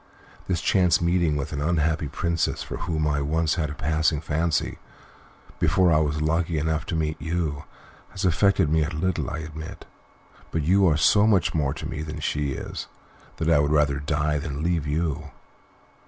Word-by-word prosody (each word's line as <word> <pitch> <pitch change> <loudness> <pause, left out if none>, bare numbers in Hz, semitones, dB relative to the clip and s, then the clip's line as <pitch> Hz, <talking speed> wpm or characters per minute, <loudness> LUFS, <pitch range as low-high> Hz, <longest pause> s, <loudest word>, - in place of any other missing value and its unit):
"This 90 -3 0
chance 90 -3 +3
meeting 85 -3 +2
with 75 +1 -3
an 70 - -3
unhappy 80 0 +1
princess 85 +3 -1
for - - -6
whom 80 -2 -2
I 75 -1 +1
once 80 +2 +1
had 80 -4 -1
a 75 - -6
passing 80 0 +1
fancy, 80 0 -1 0.8
before 90 -3 +3
I 75 - +4
was 75 0 0
lucky 80 +1 0
enough 80 +1 -1
to - - -2
meet 80 -2 -2
you, 80 -2 -2 0.4
has 95 -1 -4
affected 95 -1 +3
me 80 +1 +2
a 75 - -2
little, 85 +3 -1
I - - -4
admit, 80 0 -9 0.6
but 80 - -1
you 95 +4 +4
are 75 -3 +3
so 105 +8 +5
much 95 -6 +3
more 70 -5 0
to - - -5
me - - -5
than 75 0 -6
she 75 -2 -1
is - - -6 0.5
that 80 - -2
I 75 - +5
would 75 0 +1
rather 75 -2 +2
die 75 0 0
than 70 +1 -4
leave 85 -3 0
you." 75 -1 -2
80 Hz, 185 wpm, -25 LUFS, 75-85 Hz, 0.8 s, so